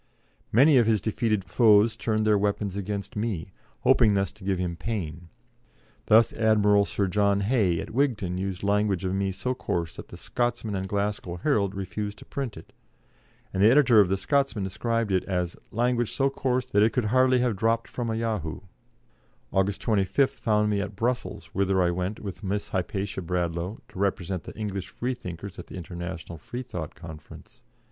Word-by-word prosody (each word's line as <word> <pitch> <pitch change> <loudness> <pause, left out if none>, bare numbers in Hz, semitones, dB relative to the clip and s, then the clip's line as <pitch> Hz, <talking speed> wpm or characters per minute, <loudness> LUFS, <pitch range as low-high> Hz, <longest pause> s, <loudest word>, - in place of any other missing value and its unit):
Many 135 +5 +6
of 120 -3 +4
his 110 -2 +3
defeated 110 0 0
foes 105 +4 +4
turned 110 -1 0
their 105 -1 +4
weapons 100 -1 0
against 100 +2 -4
me, 105 -5 -3 0.3
hoping 105 -3 +4
thus 100 0 0
to 105 - -16
give 95 -1 0
him 90 -1 -2
pain; 85 -4 -5 0.8
thus 110 +1 +5
Admiral 105 -2 +4
Sir 100 - -1
John 100 +1 +2
Hay, 100 -6 +2
at - - -6
Wigton, 115 -8 0
used 95 0 -4
language 100 -2 +1
of 95 - -1
me 95 0 0
so 125 +7 -2
coarse 85 -9 -3
that - - -8
the - - -11
Scotsman 120 -3 -2
and 95 0 -3
Glasgow 100 -3 -2
Herald 100 - 0
refused 105 +2 -4
to - - -13
print 135 -8 -4
it, 80 - -13 0.8
and 95 - 0
the 105 - +7
editor 125 -3 +6
of 100 -4 +5
the 95 - +1
Scotsman 135 -3 0
described 115 +3 -1
it 95 -1 +2
as 90 -3 -2
"language 120 0 0
so 135 0 +1
coarse 130 -2 0
that 105 -5 +2
it 110 +1 +4
could 125 - +1
have 105 - -2
hardly 130 -1 +4
dropped 115 +3 0
from 120 -2 -4
a 110 - -1
yahoo." 110 -9 -2 0.9
August 95 +1 +1
25th 110 +5 +2
found 105 -2 +1
me 100 -1 +1
at 100 0 -5
Brussels, 120 +4 -2
whither 95 0 +1
I 90 -1 +3
went, 90 +4 -3
with 100 +1 -7
Miss 100 +1 -2
Hypatia 95 +1 -2
Bradlaugh, 85 +3 -2
to - - -10
represent 95 -2 -1
the - - -9
English 100 -4 -4
Freethinkers 100 -6 -5
at - - -8
the - - -10
International 85 -1 -6
Freethought 90 - -6
Conference. 80 -3 -12
100 Hz, 180 wpm, -26 LUFS, 95-115 Hz, 0.9 s, the